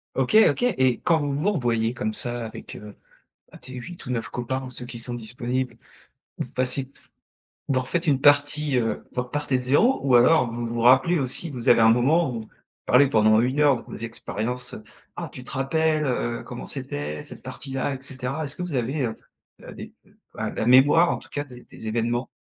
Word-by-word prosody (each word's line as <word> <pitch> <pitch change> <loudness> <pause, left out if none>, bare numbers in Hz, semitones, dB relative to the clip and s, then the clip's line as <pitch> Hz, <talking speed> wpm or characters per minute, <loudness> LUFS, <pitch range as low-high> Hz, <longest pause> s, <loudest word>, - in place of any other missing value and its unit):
OK, 135 +8 0 0.2
OK. - - -6
Et 130 - +2
quand 165 -2 +3
vous 145 -2 -2
vous 150 +9 +1
revoyez 120 - 0
comme 110 -2 -2
ça, 120 +1 -3
avec, 110 - -9
heu, 105 -1 -10 0.7
tes, 130 - -9
8 170 +8 -9
ou - - -8
9 115 -2 -2
copains, 125 +2 -3
ou 130 - -9
ceux 125 - -6
qui 120 -1 -7
sont 120 +1 -4
disponibles, 120 +1 -3 0.6
vous - - -3
passez 130 +1 -1 0.8
vous 130 -2 +2
refaites 165 +7 -2
une 135 -3 +2
partie, 145 0 +3
heu, 115 -3 -1
vous 125 - -1
repartez 135 +1 -1
de 125 - -4
0 150 - +3
ou 135 -3 +3
alors 125 0 +5
vous 120 +1 -4
vous 115 0 -3
rappelez 135 +8 +5
aussi, 135 +5 -1
vous 125 -2 -6
avez 115 -2 +6
un 110 - +7
moment 140 +8 +3
où, 115 -3 -4
vous - - -18 0.4
parlez 140 +3 +5
pendant 110 -2 +4
1 130 +4 0
heure 145 -2 +5
de - - -10
vos - - -10
expériences 115 +2 -4
heu: 110 - -10 0.3
«Ah, 170 - -4
tu 125 -1 -10
te - - -8
rappelles, 155 +3 +1
heu, 120 -2 -2
comment - - -8
c'était, 75 +1 -5
cette - - -12
partie 135 -1 -6
là?» 135 +1 -1
et 130 - -8
cetera. 135 +3 -4
Est-ce 140 - -5
que - - -7
vous 175 -5 -4
avez, 130 +4 -1
heu, 110 - -6 0.5
heu - - -9
des - - -10 0.4
ah, - - -2
la - - -3
mémoire, 140 +8 +6
en - - -1
tout - - -14
cas, 145 - -3
des 125 -3 -13
des 110 - -10
événements? 120 +2 -1
125 Hz, 215 wpm, -24 LUFS, 120-145 Hz, 0.8 s, un